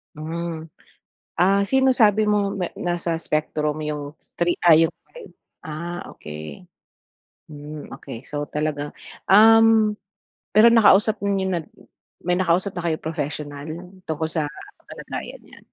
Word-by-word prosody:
Hmm. 160 0 -5 0.7
Ah, 195 +2 +4
sino 265 +5 +3
sabi 215 -2 +4
mong 205 -1 +1
na 180 -3 -1
nasa 175 -1 -2
spectrum 155 0 -1
'yung 150 0 -5 0.2
3, 175 0 0
ay 165 - +8
'yung - - -22 0.2
5? - - -11 0.3
Ah, 170 +3 -6
okey. 75 -1 -9 0.9
Hmm, 150 0 -9
okey, 120 -4 -9
so 145 0 -4
talagang 150 -1 -3 0.3
um, 220 +1 +6 0.6
pero 230 +2 +8
nakausap 215 -1 +5
niyo 195 -1 0
na 175 - +1 0.7
may 180 - +1
nakausap 185 +2 +1
na 175 - -4
kayong 160 -1 -3
professional 150 -2 -4 0.4
tungkol 160 0 -1
sa 155 -2 -1 0.4
kalagayan - - -8
niya? - - -16
170 Hz, 125 wpm, -22 LUFS, 150-200 Hz, 0.9 s, ay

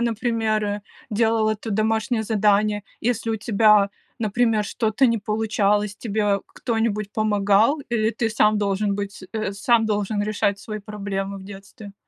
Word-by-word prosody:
например, 225 -2 0
э, 205 0 -2 0.3
делал 220 0 +2
это 215 +1 -4
домашнее 220 +2 0
задание, 210 -1 +2 0.2
если 230 -1 -1
у 220 - 0
тебя, 210 -2 +4 0.3
например, 220 0 +1
что-то 220 +5 +1
не 230 -1 +1
получалось, 210 -1 0
тебе 205 -3 0
к - - -31
кто-нибудь 225 -3 -1
помогал, 215 +5 +2
или 220 -2 +1
ты 230 -1 -1
сам 215 -1 +3
должен 200 0 0
быть, 200 -1 -5
э, 215 -3 -2
сам 225 +3 +2
должен 210 0 -1
решать 205 -1 0
свои 215 +1 -6
проблемы 200 -1 -5
в 190 - -11
детстве? 200 +1 -11
215 Hz, 150 wpm, -23 LUFS, 205-225 Hz, 0.3 s, тебя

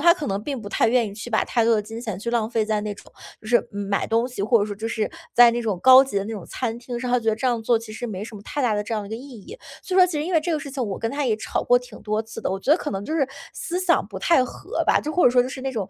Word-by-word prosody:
他 340 +3 +6
可 305 - -5
能 195 0 -2
并 275 0 -4
不 210 - -10
太 220 - +2
愿 235 -1 +3
意 200 - -7
去 210 +3 -8
把 220 -2 +1
太 235 - +1
多 230 0 +4
的 210 - +1
金 225 +2 -8
钱 215 -6 -5
去 235 +3 -4
浪 230 -2 0
费 225 -2 0
在 215 -1 0
那 210 -1 -4
种 - - -16 0.3
就 - - -12
是 240 0 +3
买 200 -1 -2
东 230 +2 +1
西， 250 -5 -5
或 230 +3 +4
者 - - +2
说 205 -1 -5
就 220 +3 -4
是 220 -2 -2 0.2
在 240 -1 +8
那 235 +1 -2
种 215 -6 -2
高 260 0 +9
级 270 -6 -5
的 195 - 0
那 225 - -5
种 200 -5 -6
餐 235 -2 -3
厅 240 0 -6
上， 250 0 -3
他 250 0 +3
觉 225 - -2
得 220 - +2
这 260 - -2
样 235 -3 0
做 235 0 +3
其 225 -1 -10
实 240 +3 -5
没 205 -2 -5
什 230 - -10
么 200 - -9
太 290 +5 -3
大 225 -4 +2
的 210 - -1
这 215 +2 -4
样 215 - -2
的 200 - -9
一 - - -13
个 220 - -3
意 265 +5 -10
义。 460 - -11 0.2
所 375 - -4
以 - - +4
说 365 - +8
其 350 - -5
实 300 0 -1
因 365 - -3
为 325 - +4
这 335 +3 -3
个 310 - +1
事 280 -1 -7
情 265 -1 -3
我 200 -3 -4
跟 225 - -2
他 285 0 -2
也 220 -3 +1
吵 220 - -3
过 245 - +4
挺 245 -3 -13
多 215 +1 -1
次 225 0 -9
的， - - -2
我 190 - -2
觉 195 - -2
得 305 - +7
可 300 - -4
能 195 +1 -4
就 315 - -3
是 290 -4 +2 0.3
思 350 - -3
想 360 -2 +2
不 - - -7
太 335 -6 +4
合 375 - -4
吧， - - +3
就 305 - -4
或 360 - +3
者 - - +7
说 245 0 +4
就 250 - -4
是 265 - -7
那 270 +1 -2
种， 205 -6 -3
235 Hz, 395 characters per minute, -23 LUFS, 215-260 Hz, 0.3 s, 高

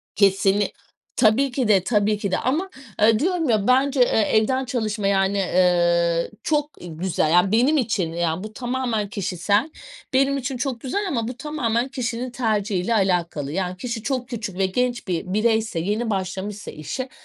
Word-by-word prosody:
Kesinli 195 0 +3 0.4
tabii 250 +3 +3
ki 245 -3 -1
de, 195 -4 +4
tabii 210 -1 +1
ki 200 -2 -3
de. - - +2
Ama, 320 +10 -1 0.3
aaa, 220 +1 +4
diyorum 335 -4 0
ya, 215 -1 +2
bence, 265 +2 +3
eee, 225 -2 +4
evden 260 +5 +2
çalışma 215 -5 -2
yani, 195 0 +2
eee, 175 -2 +2
çok 295 -1 0
güzel. 165 -1 -1
Yani 180 +3 +4
benim 260 +8 +3
için, 200 -10 0
ya, 170 +2 -1
bu 215 0 -8
tamamen 240 -5 -2
kişisel. 205 - 0 0.4
Benim 275 +1 +3
için 265 -1 -3
çok 250 -2 -3
güzel 275 +10 -2
ama 230 -6 -1
bu 250 0 -6
tamamen 255 -5 -1
kişinin 250 -1 -3
tercihiyle 215 -4 0
alakalı. 175 -7 0
Yani 185 +1 -2
kişi 230 -2 -5
çok 255 -2 -2
küçük 210 -6 -5
ve 195 - +2
genç 245 +3 -1
bir 170 -3 -2
bireyse 220 -4 +1
yeni 210 +6 -1
başlamışsa 195 +1 -4
işe 255 - -5
215 Hz, 165 wpm, -23 LUFS, 190-250 Hz, 0.4 s, de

